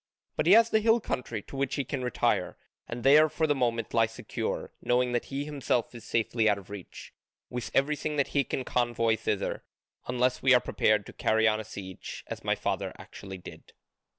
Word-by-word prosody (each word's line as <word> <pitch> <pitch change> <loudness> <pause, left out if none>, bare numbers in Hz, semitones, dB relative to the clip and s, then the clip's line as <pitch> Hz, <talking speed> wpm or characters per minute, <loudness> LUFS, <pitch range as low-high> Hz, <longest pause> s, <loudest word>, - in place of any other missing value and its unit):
But - - 0
he 185 - +8
has 230 +1 +6
the 220 - +4
hill 225 +2 +4
country 120 - -4
to - - -11
which 135 -1 -1
he 140 - -1
can 135 0 -4
retire, 125 - 0 0.3
and 120 0 -6
there 150 +3 +7
for 160 - 0
the 150 - +3
moment 120 -4 -1
lie 115 -1 +4
secure, 115 - -4
knowing 125 0 +2
that 120 -1 -1
he 140 +1 -4
himself 140 -5 -1
is 120 - -10
safely 115 -1 +1
out 105 - +2
of 100 0 -12
reach, 100 -3 -9 0.4
with 125 -1 -4
everything 150 +2 +1
that 140 -2 +1
he 140 - +2
can 130 - -3
convoy 120 -2 +1
thither; 110 -2 -2 0.4
unless 125 0 +1
we 130 -1 +6
are - - +6
prepared 105 -4 +1
to - - -11
carry 110 +1 +2
on 110 0 +2
a - - -4
siege, 95 -3 -8
as - - -7
my - - +1
father - - -2
actually 95 -1 -9
did." 90 - -12
125 Hz, 205 wpm, -29 LUFS, 110-140 Hz, 0.4 s, he